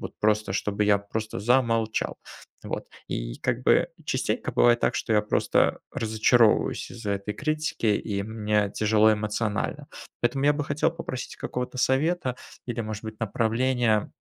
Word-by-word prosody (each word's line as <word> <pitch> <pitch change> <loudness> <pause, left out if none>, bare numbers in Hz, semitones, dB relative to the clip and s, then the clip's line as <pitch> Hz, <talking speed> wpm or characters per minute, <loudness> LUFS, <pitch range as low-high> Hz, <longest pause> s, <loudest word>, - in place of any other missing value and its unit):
вот - - -8
просто 105 -2 +1
чтобы 105 +1 0
я 105 -1 +4
просто 110 +2 -5
замолчал, 115 0 +1 0.5
вот. - - -5 0.2
И - - -4
как - - -1
бы - - +4 0.2
частенько - - -1
бывает 120 0 +4
так, - - +1
что - - -1
я 105 -1 +4
просто 105 - +2
разочаровываюсь 110 +1 +2
из-за 110 -4 -4
этой 100 +1 -3
критики, 155 -5 -2
и 105 -1 0
мне 105 -1 0
тяжело 110 0 +4
эмоционально. 110 +6 -2 0.3
Поэтому 125 +3 0
я 145 - +6
бы 145 0 -2
хотел 150 +3 +1
попросить 160 -6 -6
какого-то 125 +1 -4
совета 135 +1 +1 0.3
или, 120 -1 -3
может 110 -1 -5
быть, 110 -1 -8
направления, 115 0 +1
110 Hz, 150 wpm, -26 LUFS, 105-125 Hz, 0.5 s, я